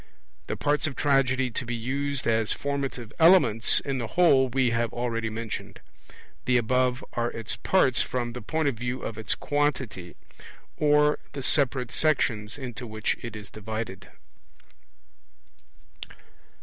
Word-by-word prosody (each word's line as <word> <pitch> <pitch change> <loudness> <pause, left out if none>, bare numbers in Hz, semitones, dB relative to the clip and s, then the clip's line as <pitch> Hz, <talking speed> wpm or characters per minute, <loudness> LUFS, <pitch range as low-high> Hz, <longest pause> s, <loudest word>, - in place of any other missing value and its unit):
The - - -3
parts 150 +1 +1
of 140 - -5
Tragedy 130 -3 +2
to 130 - -3
be 120 0 -3
used 135 +3 -2
as 115 -1 +2
formative 135 -5 -3
elements 150 - +5
in 135 -2 -3
the 115 - -3
whole 140 -4 +4
we 130 -1 +1
have 115 0 0
already 115 -2 -2
mentioned; 110 0 -6 0.7
the 125 0 +3
above 125 +2 +1
are 120 0 0
its 115 -2 -5
parts 135 -10 +2
from 120 -2 -2
the 125 - -6
point 160 -1 -1
of 140 - +2
view 125 +2 -4
of 110 -1 -5
its 110 - -1
quantity, 130 - -2 0.6
or 150 0 +3
the 140 - -5
separate 130 -3 +2
sections 115 -9 +1
into 125 -3 -7
which 110 0 -1
it 115 -2 -7
is 105 -1 -9
divided. 110 -2 -6
125 Hz, 140 wpm, -26 LUFS, 115-140 Hz, 0.7 s, elements